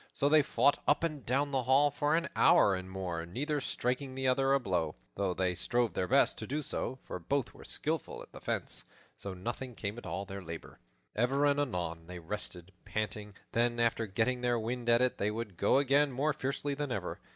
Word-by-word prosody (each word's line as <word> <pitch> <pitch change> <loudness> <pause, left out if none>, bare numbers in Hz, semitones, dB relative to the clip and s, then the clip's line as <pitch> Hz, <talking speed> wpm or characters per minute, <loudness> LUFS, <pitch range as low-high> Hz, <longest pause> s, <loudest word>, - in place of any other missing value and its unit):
So 140 - +2
they 155 0 +7
fought 140 0 +3
up 145 - +3
and 155 -5 -2
down 140 +4 +1
the 135 -1 +1
hall 135 +4 +4
for 145 +2 +1
an 170 0 +1
hour 100 - +6
and 95 0 -4
more, 90 -3 -3
neither 145 - -2
striking 130 +2 -2
the 130 0 -1
other 135 +1 +3
a 140 - +5
blow, 90 - -1 0.2
though 95 -2 -1
they 90 -1 +1
strove 120 +6 0
their 90 - -1
best - - +4
to - - -5
do 150 +3 -2
so; 130 - -3
for - - -6
both 135 - -1
were - - -13
skillful - - -3
at - - -17
the - - -11
fence; - - -3 0.3
so 100 -2 -6
nothing 120 +6 -5
came 105 +3 -4
of - - -10
all 100 - -3
their 95 0 -7
labor. 85 -2 -8 0.4
Ever 135 +6 +2
and 145 0 +3
anon 85 - -2
they 90 0 -7
rested, 90 0 -6
panting; 105 -1 -4 0.2
then, 120 0 +1
after 115 -1 +2
getting 115 +5 0
their 120 -1 +2
wind, 120 +2 -2
at 120 +1 +5
it 125 - 0
they 100 - +1
would 105 -3 -4
go - - +3
again 140 +1 +4
more 145 +4 +1
fiercely 140 0 -2
than 145 -1 -3
ever. 100 -7 -3
120 Hz, 215 wpm, -32 LUFS, 95-140 Hz, 0.4 s, they